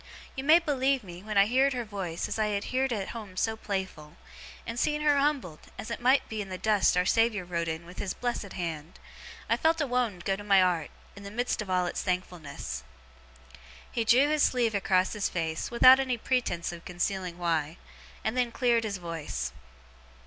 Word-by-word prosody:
You 265 - -4
may 310 +4 +7
believe 275 -5 +1
me, 175 -2 -10
when 210 0 -3
I 200 - +7
heerd 260 +5 +3
her 245 -2 -3
voice, 190 -6 -4
as - - -4
I 215 - +2
had 205 -1 -1
heerd 260 0 +1
at 205 -4 -2
home 210 -5 -8
so 225 +2 0
playful 190 -8 -5 0.5
and 230 +1 -4
see 300 +3 +1
her 295 -1 +3
humbled, 275 - 0 0.2
as - - -6
it - - -4
might 260 +3 +3
be 220 -1 -4
in 195 - -7
the 185 - -5
dust 210 -2 +2
our 180 - +3
Saviour 225 -2 +2
wrote 170 -1 -2
in 160 +1 -4
with 175 +1 -11
his 195 - -3
blessed 240 -5 -3
hand 165 -2 -5 0.5
I - - +2
felt 325 +1 +2
a 295 - +1
wownd 240 -8 -1
go 195 - +1
to 205 - -9
my 200 -1 +5
'art, 180 -4 +2 0.3
in 200 - -11
the 200 - -8
midst 240 +2 -1
of 205 - -7
all 180 -1 +2
its 175 - -3
thankfulness.' 155 - -4 1.1
He 230 - 0
drew 245 +6 +5
his 305 0 +1
sleeve 240 -5 +2
across 190 -2 +2
his 210 -2 -1
face, 160 -2 -2
without 255 +2 +7
any 260 -2 0
pretence 230 -9 -1
of 170 -1 -10
concealing 180 0 -3
why; 165 -2 -1 0.5
and 220 - -1
then 250 -2 +1
cleared 235 -2 +2
his 200 -3 -3
voice. 165 -3 -4
205 Hz, 205 wpm, -28 LUFS, 180-245 Hz, 1.1 s, may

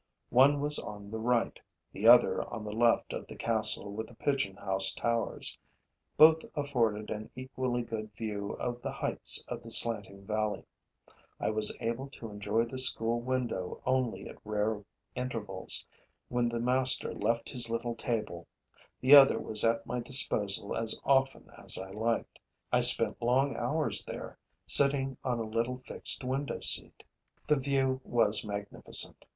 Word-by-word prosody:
One 140 +4 +5
was 150 0 +3
on 105 -1 -9
the 110 - -4
right, 120 +1 0 0.3
the - - -1
other - - +6
on 115 -2 -6
the 105 - -6
left 115 +2 +1
of - - -6
the - - -10
castle 110 -3 +4
with 110 +1 -5
the 120 - -16
pigeon 125 -8 -1
house 95 -1 +2
towers; 115 -1 -2 0.6
both 160 +1 +7
afforded 115 -8 -1
an 110 0 -6
equally 130 -1 -3
good 110 -2 -6
view 105 -2 -5
of 120 0 -5
the - - -4
heights - - 0
of - - -6
the - - -11
slanting 100 -4 +2
valley. 110 0 -2 0.8
I - - -1
was 110 -1 -1
able 115 +4 -3
to 115 -5 -9
enjoy 105 +3 -1
the 130 +2 -2
school 115 -2 +1
window 120 -7 -3
only 130 -2 -1
at - - -13
rare 105 0 -2 0.3
intervals, 115 -7 -3 0.4
when 120 -1 0
the 120 0 -3
master 130 +2 +1
left 115 +3 -1
his 120 -2 0
little 115 +1 -3
table; 105 -8 -4 0.5
the 130 +3 +5
other 140 -2 +8
was 105 -1 0
at 115 0 +1
my 125 +1 -3
disposal 105 -5 0
as 115 -1 0
often 135 -1 +1 0.2
as - - -1
I 95 0 -7
liked. 115 +3 -3 0.3
I - - +5
spent - - +3
long 130 +4 +1
hours 155 +1 0
there, - - -8 0.3
sitting 135 -2 +3
on 125 -2 -1
a 115 - -3
little 115 +3 -2
fixed - - -1
window 135 +2 -3
seat. - - -1 0.4
The 150 0 +2
view 135 -1 0
was 110 -3 +3
magnificent. 100 -1 0
115 Hz, 155 wpm, -30 LUFS, 105-130 Hz, 0.8 s, other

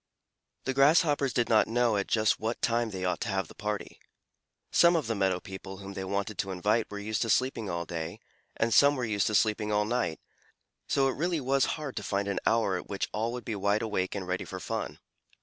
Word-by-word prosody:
The 135 - -1
Grasshoppers 145 0 +4
did 120 -1 +1
not 110 -2 +4
know 120 -1 +2
at 100 - -1
just 110 -1 +2
what 115 +2 -2
time 115 -1 +1
they 95 -3 -4
ought 90 - -1
to - - -2
have 95 -3 -1
the - - -13
party. 105 -1 -4 0.7
Some 170 0 +6
of 160 -5 +1
the 115 - -1
meadow 95 -3 +1
people 95 0 -8
whom 100 0 -8
they 95 - -4
wanted 100 +2 -3
to 95 - -1
invite 105 +5 0
were 105 - -6
used 105 +1 -2
to 115 - 0
sleeping 120 -4 +1
all 85 0 -2
day, 85 -1 -5 0.4
and 115 0 +1
some 145 0 +6
were 125 -3 -2
used 105 -3 +1
to 110 - 0
sleeping 105 0 +2
all 105 0 +2
night, 110 -8 -1 0.7
so 135 -1 +2
it 135 - 0
really 170 +2 0
was 135 0 +2
hard 150 -4 -6
to 105 - -3
find 100 0 -1
an 100 - -1
hour 110 -5 +2
at - - -8
which 100 - -2
all 110 +2 -1
would 125 - -6
be 110 - -3
wide 100 +2 +1
awake 100 -4 -1
and 95 -2 -4
ready 90 +1 -1
for - - -7
fun. - - -4
105 Hz, 230 wpm, -29 LUFS, 100-120 Hz, 0.7 s, Some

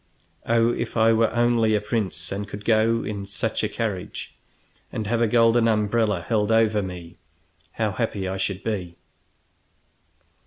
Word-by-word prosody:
"Oh, 115 0 +3
if 120 0 -4
I 115 0 +5
were 115 0 +3
only 120 -2 +2
a - - +2
prince, 100 -5 -3
and 100 +1 -4
could 100 0 -8
go 115 0 +3
in 100 -2 -5
such 105 +3 -2
a 105 - 0
carriage 105 -4 -4 0.6
and 110 - -3
have 115 +2 0
a 115 - +4
golden 115 +1 +4
umbrella 105 -3 +1
held 110 -2 +1
over 110 -2 +3
me, 90 -3 -8 0.6
how - - -1
happy 95 -2 -2
I 95 +1 -3
should 95 0 -3
be!" 90 -6 -3
110 Hz, 155 wpm, -24 LUFS, 100-115 Hz, 0.6 s, I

